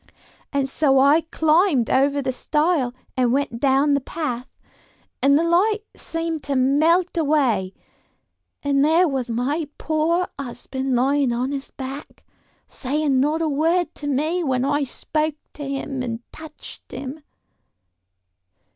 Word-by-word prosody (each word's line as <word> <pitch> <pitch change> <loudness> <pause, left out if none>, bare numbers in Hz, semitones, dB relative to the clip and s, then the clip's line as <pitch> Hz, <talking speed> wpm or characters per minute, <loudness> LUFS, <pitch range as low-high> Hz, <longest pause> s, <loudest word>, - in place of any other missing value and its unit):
"And 280 -2 0
so 270 0 +2
I 280 +4 +5
climbed 315 - +3
over 280 +1 +2
the 260 - 0
stile 300 0 0 0.2
and 250 -2 +2
went 265 -3 -1
down 275 +2 +3
the 280 - +2
path, 255 -4 -4 0.7
and 280 +1 +5
the 325 - +2
light 390 +6 +2
seemed 330 -1 -3
to 280 - -1
melt 315 +8 +3
away; 260 - +1 0.9
and 280 -1 +2
there 330 +4 +4
was 265 -5 -2
my 280 +7 -1
poor 330 +3 0
husband 265 0 -3
lying 270 +1 +2
on 250 +3 -1
his 275 -1 -4
back, 270 +1 -8 0.4
saying 280 0 0
not 305 +4 +1
a - - +1
word 325 +4 +1
to 290 - -7
me 310 +6 0
when 260 -3 0
I 290 0 +1
spoke 305 +3 -2 0.2
to 290 -2 -6
him 275 -1 -3
and 235 -2 -4
touched 315 -1 -11
him." 275 +3 -6
285 Hz, 140 wpm, -22 LUFS, 265-315 Hz, 0.9 s, I